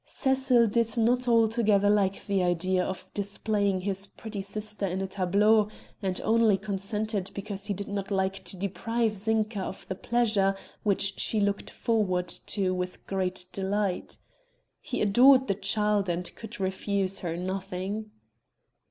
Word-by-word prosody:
Cecil 265 Hz, -3 st, +3 dB
did 230 Hz, +1 st, +2 dB
not 245 Hz, +2 st, +3 dB
altogether 225 Hz, -3 st, +3 dB
like 200 Hz, -2 st, +2 dB
the 200 Hz, -2 st, +1 dB
idea 180 Hz, +1 st, +1 dB
of 190 Hz, 0 st, -5 dB
displaying 200 Hz, -1 st, 0 dB
his 195 Hz, +1 st, -2 dB
pretty 215 Hz, -1 st, -7 dB
sister 210 Hz, +1 st, -3 dB
in 185 Hz, +1 st, -2 dB
a 195 Hz, -, -1 dB
tableau 200 Hz, +3 st, +3 dB, 0.3 s
and 190 Hz, -2 st, -2 dB
only 220 Hz, -2 st, +4 dB
consented 205 Hz, 0 st, -3 dB
because 200 Hz, 0 st, -5 dB
he 205 Hz, -, -1 dB
did 200 Hz, +2 st, -5 dB
not 200 Hz, -1 st, -4 dB
like 190 Hz, -1 st, -1 dB
to 180 Hz, +2 st, -6 dB
deprive 220 Hz, +4 st, -1 dB
Zinka 215 Hz, +1 st, 0 dB
of 190 Hz, -, -6 dB
the -, -, -2 dB
pleasure 210 Hz, -2 st, +1 dB, 0.3 s
which 200 Hz, -1 st, +1 dB
she 220 Hz, -, 0 dB
looked 200 Hz, 0 st, 0 dB
forward 185 Hz, -6 st, 0 dB, 0.2 s
to 190 Hz, -3 st, 0 dB
with 180 Hz, 0 st, -4 dB
great 185 Hz, -1 st, -2 dB
delight. 195 Hz, -1 st, -2 dB, 0.6 s
He -, -, -2 dB
adored 255 Hz, +6 st, +6 dB
the 200 Hz, -, +2 dB
child 205 Hz, 0 st, +1 dB
and 175 Hz, +1 st, -3 dB
could 225 Hz, 0 st, -9 dB
refuse 195 Hz, 0 st, -1 dB
her 170 Hz, -2 st, -3 dB
nothing. 190 Hz, +3 st, -4 dB
200 Hz, 145 wpm, -28 LUFS, 190-215 Hz, 0.6 s, adored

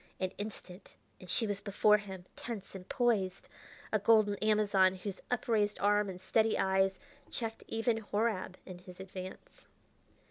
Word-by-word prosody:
An 185 Hz, -1 st, -1 dB
instant 205 Hz, -2 st, -8 dB, 0.2 s
and 185 Hz, -, -12 dB
she 225 Hz, -, +2 dB
was 205 Hz, -2 st, -2 dB
before 210 Hz, +1 st, +4 dB
him, 190 Hz, -3 st, -8 dB
tense 225 Hz, -5 st, -6 dB
and 190 Hz, -1 st, -9 dB
poised, 205 Hz, -7 st, +1 dB, 0.5 s
a 215 Hz, -, +4 dB
golden 215 Hz, 0 st, +5 dB
Amazon, 200 Hz, -3 st, +3 dB
whose 190 Hz, +1 st, -6 dB
upraised 220 Hz, -4 st, +1 dB
arm 205 Hz, 0 st, +3 dB
and 185 Hz, -1 st, -7 dB
steady 220 Hz, +4 st, +2 dB
eyes 190 Hz, 0 st, +2 dB, 0.3 s
checked 225 Hz, -2 st, -4 dB
even 225 Hz, 0 st, +1 dB
Horab 210 Hz, -3 st, -1 dB
in 185 Hz, -2 st, -9 dB
his 180 Hz, 0 st, -13 dB
advance. 185 Hz, -1 st, -9 dB
205 Hz, 145 wpm, -33 LUFS, 190-220 Hz, 0.5 s, golden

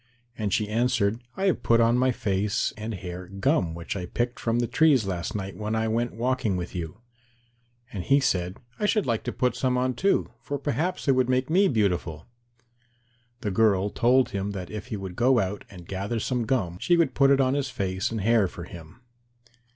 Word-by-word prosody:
And 105 Hz, -3 st, -2 dB
she 105 Hz, +2 st, +1 dB
answered, 115 Hz, -1 st, +1 dB, 0.2 s
"I 190 Hz, -, 0 dB
have 185 Hz, -10 st, +2 dB
put 115 Hz, 0 st, +3 dB
on 115 Hz, +1 st, +4 dB
my 130 Hz, +1 st, +3 dB
face 100 Hz, -2 st, -1 dB
and 110 Hz, 0 st, -5 dB
hair 90 Hz, 0 st, -7 dB
gum 90 Hz, -3 st, 0 dB
which 85 Hz, +3 st, -5 dB
I 90 Hz, -3 st, -4 dB
picked 120 Hz, +5 st, -2 dB
from 115 Hz, 0 st, 0 dB
the 120 Hz, -, +1 dB
trees 145 Hz, -3 st, +3 dB
last 90 Hz, -1 st, -3 dB
night 95 Hz, -1 st, -4 dB
when 110 Hz, +1 st, -3 dB
I 110 Hz, 0 st, 0 dB
went 115 Hz, +1 st, -1 dB
walking 120 Hz, -4 st, 0 dB
with 90 Hz, 0 st, -5 dB
you." 85 Hz, +3 st, -6 dB, 0.9 s
And 95 Hz, -4 st, -4 dB
he 140 Hz, +7 st, +4 dB
said, 90 Hz, -8 st, 0 dB, 0.2 s
"I 210 Hz, -, +1 dB
should 210 Hz, -1 st, +2 dB
like 115 Hz, -3 st, 0 dB
to -, -, -1 dB
put 125 Hz, -2 st, 0 dB
some 125 Hz, -1 st, 0 dB
on 130 Hz, 0 st, +1 dB
too, 195 Hz, -, +1 dB
for 145 Hz, -, -3 dB
perhaps 150 Hz, +6 st, -2 dB
it -, -, +6 dB
would 130 Hz, -1 st, +2 dB
make 130 Hz, +3 st, +1 dB
me 195 Hz, +4 st, +5 dB
beautiful." 90 Hz, -, 0 dB, 1.2 s
The 105 Hz, -, -2 dB
girl 100 Hz, -1 st, +2 dB
told 125 Hz, +2 st, +3 dB
him 100 Hz, +1 st, -3 dB
that 90 Hz, -3 st, -6 dB
if 105 Hz, +2 st, -6 dB
he 110 Hz, -4 st, -4 dB
would 95 Hz, -2 st, -7 dB
go 125 Hz, +3 st, +3 dB
out 100 Hz, -2 st, -1 dB
and 90 Hz, -4 st, -12 dB
gather 100 Hz, +4 st, -3 dB
some 125 Hz, +1 st, -1 dB
gum 90 Hz, -10 st, -1 dB
she 175 Hz, -, +3 dB
would 165 Hz, -5 st, +2 dB
put 140 Hz, 0 st, +4 dB
it 140 Hz, 0 st, +4 dB
on 130 Hz, -1 st, +3 dB
his 140 Hz, -1 st, -1 dB
face 95 Hz, -5 st, -2 dB
and 115 Hz, -2 st, -3 dB
hair 110 Hz, -1 st, +3 dB
for 85 Hz, -, -8 dB
him. 85 Hz, +5 st, -12 dB
110 Hz, 210 wpm, -26 LUFS, 95-130 Hz, 1.2 s, it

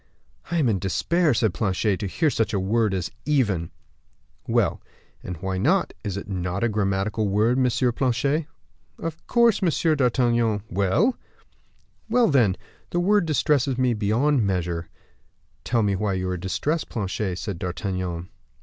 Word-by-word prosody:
"I 170 Hz, -, 0 dB
am 150 Hz, -6 st, +2 dB
in 105 Hz, -5 st, +1 dB
despair," 165 Hz, -, +1 dB
said 110 Hz, -4 st, +1 dB
Planchet, 100 Hz, -1 st, 0 dB
"to 100 Hz, -, -2 dB
hear 155 Hz, -, +1 dB
such 115 Hz, -3 st, 0 dB
a -, -, +1 dB
word 105 Hz, +3 st, +1 dB
as 90 Hz, -2 st, -3 dB
even." 105 Hz, -, +1 dB, 0.8 s
"Well, -, -, +1 dB, 0.4 s
and 90 Hz, -, -6 dB
why 95 Hz, +2 st, -3 dB
not; 175 Hz, -, +2 dB
is 100 Hz, -3 st, -3 dB
it 100 Hz, -, -6 dB
not 90 Hz, 0 st, -3 dB
a 120 Hz, -, +2 dB
grammatical 105 Hz, +1 st, 0 dB
word, 110 Hz, +6 st, +2 dB
Monsieur 125 Hz, 0 st, +2 dB
Planchet?" 140 Hz, +5 st, 0 dB, 0.5 s
"Of 165 Hz, 0 st, -6 dB
course, 235 Hz, -3 st, +4 dB
Monsieur 165 Hz, -2 st, +2 dB
d'Artagnan." 120 Hz, -5 st, +1 dB
"Well!" 100 Hz, -, +2 dB, 0.9 s
"Well, 240 Hz, 0 st, +4 dB
then, 120 Hz, -, +3 dB, 0.3 s
the 175 Hz, -, -1 dB
word 195 Hz, 0 st, +3 dB
distresses 140 Hz, -4 st, +1 dB
me 130 Hz, -2 st, +2 dB
beyond 115 Hz, +6 st, +2 dB
measure." 85 Hz, -4 st, -2 dB, 0.7 s
"Tell 115 Hz, -2 st, +1 dB
me 100 Hz, -1 st, +1 dB
why 100 Hz, +1 st, -1 dB
you 95 Hz, 0 st, -2 dB
are 90 Hz, -, -1 dB
distressed, 145 Hz, -, -2 dB
Planchet," 95 Hz, -3 st, -3 dB
said 95 Hz, -3 st, -5 dB
D'Artagnan. 90 Hz, -1 st, -3 dB
110 Hz, 150 wpm, -24 LUFS, 95-140 Hz, 0.9 s, course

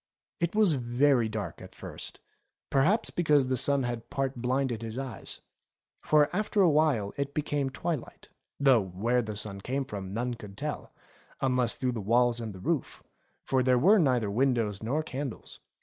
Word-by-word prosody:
It 170 Hz, +3 st, -1 dB
was 210 Hz, -6 st, +5 dB
very 125 Hz, -1 st, +2 dB
dark 110 Hz, -1 st, -5 dB
at -, -, -12 dB
first, -, -, -8 dB, 0.5 s
perhaps 165 Hz, +12 st, +2 dB
because 150 Hz, -5 st, +3 dB
the 130 Hz, -, +2 dB
sun 140 Hz, +2 st, +3 dB
had 120 Hz, -2 st, -4 dB
part 135 Hz, -1 st, -2 dB
blinded 125 Hz, -2 st, 0 dB
his 115 Hz, +1 st, -5 dB
eyes; 135 Hz, -3 st, -6 dB, 0.6 s
for 150 Hz, -1 st, +4 dB
after 210 Hz, +1 st, 0 dB
a 175 Hz, -, +5 dB
while 145 Hz, -10 st, +2 dB
it 140 Hz, 0 st, -3 dB
became 145 Hz, -2 st, -1 dB
twilight, 145 Hz, +1 st, -5 dB, 0.3 s
though 135 Hz, -5 st, +5 dB
where 105 Hz, +7 st, 0 dB
the 110 Hz, -2 st, -4 dB
light 100 Hz, -1 st, -8 dB
came 135 Hz, +5 st, -2 dB
from 95 Hz, -5 st, -6 dB
none 120 Hz, +4 st, -2 dB
could 105 Hz, -4 st, -11 dB
tell, 150 Hz, +3 st, -5 dB, 0.5 s
unless 125 Hz, -3 st, +1 dB
through 130 Hz, -1 st, -1 dB
the 115 Hz, -3 st, -4 dB
walls 120 Hz, +3 st, +2 dB
and 110 Hz, -2 st, -4 dB
the 95 Hz, -, -10 dB
roof; -, -, -2 dB, 0.4 s
for 130 Hz, -1 st, +1 dB
there 125 Hz, 0 st, +3 dB
were 200 Hz, -, +5 dB
neither 125 Hz, -, +2 dB
win 130 Hz, +4 st, +2 dB
dows 105 Hz, -4 st, -2 dB
nor 140 Hz, +8 st, -1 dB
candles. 135 Hz, -4 st, -6 dB
125 Hz, 175 wpm, -29 LUFS, 115-140 Hz, 0.6 s, was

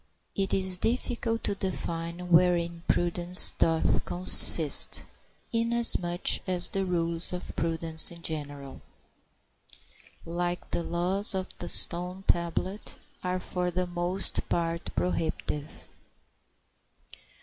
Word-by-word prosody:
It 195 Hz, -1 st, -4 dB
is 185 Hz, -1 st, +1 dB
difficult 230 Hz, 0 st, -4 dB
to -, -, -3 dB
define 175 Hz, -2 st, -7 dB
wherein 170 Hz, -1 st, 0 dB
prudence 175 Hz, +1 st, +4 dB
doth 165 Hz, -1 st, -2 dB
consist, 180 Hz, +1 st, +6 dB, 0.5 s
inasmuch 230 Hz, -6 st, 0 dB
as 180 Hz, -1 st, -2 dB
the 195 Hz, 0 st, -4 dB
rules 170 Hz, -1 st, -2 dB
of 180 Hz, -, -9 dB
prudence 165 Hz, -1 st, +5 dB
in 170 Hz, -1 st, -15 dB
general, 145 Hz, -3 st, -9 dB, 1.4 s
like 175 Hz, +1 st, -6 dB
the -, -, -3 dB
laws 185 Hz, +5 st, -3 dB
of 185 Hz, -1 st, -7 dB
the 175 Hz, -, -6 dB
stone 180 Hz, +2 st, +3 dB
tablet, 175 Hz, +4 st, -4 dB, 0.3 s
are 180 Hz, 0 st, -4 dB
for 180 Hz, 0 st, -4 dB
the 180 Hz, +1 st, -4 dB
most 175 Hz, +2 st, -4 dB
part 170 Hz, 0 st, -4 dB
prohibitive. 160 Hz, -4 st, -6 dB
175 Hz, 105 wpm, -25 LUFS, 170-185 Hz, 1.4 s, consist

